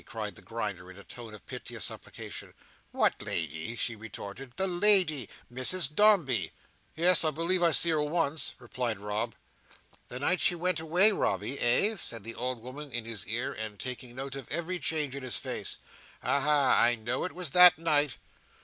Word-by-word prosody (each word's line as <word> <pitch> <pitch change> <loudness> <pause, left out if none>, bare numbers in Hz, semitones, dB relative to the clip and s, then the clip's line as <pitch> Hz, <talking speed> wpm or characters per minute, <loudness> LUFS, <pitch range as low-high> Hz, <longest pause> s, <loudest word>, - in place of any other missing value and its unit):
cried 110 -2 -6
the - - -14
Grinder 105 -6 -5
in 95 - -12
a 100 - -12
tone 120 -2 -9
of 105 -2 -12
piteous - - -6
supplication. - - -8 0.3
"What - - +1
lady?" 80 +6 -4
she 120 0 -1
retorted. 110 +3 -9
"The 190 - +2
lady; 180 - +3 0.2
Mrs 145 +4 +2
Dombey." 150 - +3 0.4
"Yes, 170 +2 +4
I 160 - +2
believe 170 +4 0
I 170 - +4
see 170 +1 +5
her 155 -2 +1
once," 155 0 -1
replied 120 -3 -3
Rob. 105 +3 -3 0.7
"The 125 - -6
night 180 +6 +1
she 175 - +4
went 175 0 -1
away, 175 +7 +6
Robby, 140 -8 -1
eh?" 200 - +3
said 115 - -4
the 115 +2 -5
old 125 -1 -4
woman 140 +3 -8
in 120 -1 -4
his 115 -4 -4
ear, 120 +5 -3
and 110 -1 -6
taking 125 +1 -6
note 135 +1 -6
of 135 -4 -9
every 170 +3 -3
change 150 -5 0
in 140 - -6
his 130 -2 -1
face. - - -3 0.5
"Aha! 140 0 +3
I 120 +1 +4
know 120 +3 -3
it 180 - -4
was 175 -5 -3
that 180 +1 +8
night." 150 -5 +1
135 Hz, 180 wpm, -29 LUFS, 115-165 Hz, 0.7 s, that